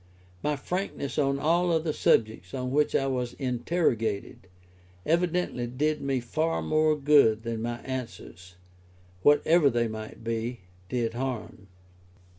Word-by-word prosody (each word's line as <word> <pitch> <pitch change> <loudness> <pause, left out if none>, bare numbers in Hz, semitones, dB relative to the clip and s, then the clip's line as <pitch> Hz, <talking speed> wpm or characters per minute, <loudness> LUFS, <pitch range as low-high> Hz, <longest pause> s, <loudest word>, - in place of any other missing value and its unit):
My 150 0 0
frankness 165 -2 -3
on 140 -1 +2
all 170 +5 +2
other 160 -1 0
subjects 110 -7 +1
on 125 -1 -3
which 150 +2 +2
I 135 - +2
was 125 -2 -2
interrogated, 120 - -1 0.6
evidently 170 -6 0
did 150 +5 -1
me 135 -1 0
far 155 +7 -1
more 155 0 +2
good 140 -7 +4
than 115 -1 -3
my 120 +1 -3
answers, 115 -8 -7 0.7
whatever 145 - +5
they 120 -2 +1
might 110 0 -8
be, 115 +1 -3 0.3
did 115 -2 -1
harm. 120 -5 -5
130 Hz, 125 wpm, -27 LUFS, 115-155 Hz, 0.7 s, whatever